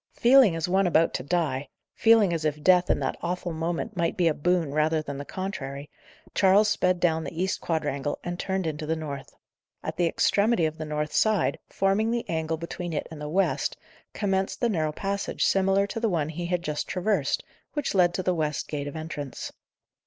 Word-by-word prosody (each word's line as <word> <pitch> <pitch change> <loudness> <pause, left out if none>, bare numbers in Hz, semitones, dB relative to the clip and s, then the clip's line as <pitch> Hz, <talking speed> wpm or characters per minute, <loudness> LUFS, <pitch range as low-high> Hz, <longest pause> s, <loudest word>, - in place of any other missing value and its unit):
Feeling 245 -7 +6
as 165 0 -1
one 190 +1 +3
about 165 -1 +3
to - - -2
die; 145 -4 -1 0.2
feeling 225 -5 +5
as 165 -2 -2
if 150 -1 -1
death, 180 -1 +5
in - - +3
that 135 - -2
awful 175 0 -3
moment, 170 +6 -3
might 170 -2 0
be 175 -2 +3
a 160 - +3
boon, 170 0 +1
rather 155 +1 +2
than 140 -2 -5
the 145 - -6
contrary, 145 -8 -5 0.4
Charles 200 +2 +5
sped 185 -4 +1
down 160 -2 +2
the 165 - -6
east 190 +1 -1
quadrangle, 145 -3 -2
and 175 0 -4
turned 190 -1 -1
into 155 -1 -3
the 160 - +1
north. 140 -4 -7 0.5
At - - -4
the 175 -1 +3
extremity 200 +1 +2
of 155 0 -3
the 155 - -3
north 150 0 -3
side, 215 -2 +2
forming 195 +3 +1
the 235 0 -1
angle 160 0 -1
between 170 +1 -5
it 150 - -2
and 155 -2 -8
the 150 - -4
west, 190 +5 0 0.3
commenced 195 -1 -1
the 240 - +2
narrow 160 -7 0
passage 195 +5 -2
similar 195 +1 +3
to 200 - -5
the 225 -1 +1
one 160 -5 0
he 170 +2 -4
had 175 -1 -1
just 150 -2 -3
traversed, 200 +4 0 0.3
which 295 -3 -2
led 180 -2 +3
to 185 - -2
the 180 - +1
west 155 -3 -2
gate 145 -1 -4
of 145 - -6
entrance. 155 -4 -6
170 Hz, 205 wpm, -26 LUFS, 155-190 Hz, 0.5 s, Feeling